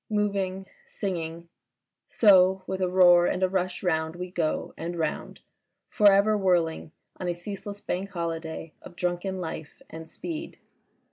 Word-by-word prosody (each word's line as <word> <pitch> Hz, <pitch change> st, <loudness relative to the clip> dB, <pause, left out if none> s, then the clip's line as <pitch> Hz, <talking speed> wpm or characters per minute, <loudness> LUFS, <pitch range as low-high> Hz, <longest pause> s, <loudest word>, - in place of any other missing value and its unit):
Moving, 200 Hz, -3 st, -1 dB, 0.2 s
singing... 170 Hz, -3 st, -4 dB, 0.6 s
so 190 Hz, -3 st, +5 dB
with 190 Hz, 0 st, -4 dB
a 185 Hz, -, +1 dB
roar 175 Hz, -1 st, +6 dB
and 185 Hz, -, -1 dB
a -, -, +5 dB
rush 185 Hz, 0 st, -2 dB
round 160 Hz, -2 st, 0 dB
we 180 Hz, 0 st, -6 dB
go 165 Hz, -4 st, -2 dB
and 170 Hz, +1 st, -5 dB
round, 160 Hz, -2 st, -3 dB, 0.5 s
for 205 Hz, -1 st, +6 dB
ever 200 Hz, +2 st, +4 dB
whirling 175 Hz, -6 st, +1 dB, 0.3 s
on 180 Hz, -, -4 dB
a 175 Hz, -, 0 dB
ceaseless 200 Hz, +3 st, -7 dB
Bank 190 Hz, +2 st, -3 dB
Holiday 165 Hz, -2 st, -5 dB
of 175 Hz, -, -12 dB
drunken 180 Hz, +2 st, -2 dB
life 160 Hz, -3 st, -6 dB
and 160 Hz, 0 st, -9 dB
speed. 330 Hz, -, -7 dB
180 Hz, 145 wpm, -27 LUFS, 170-195 Hz, 0.6 s, roar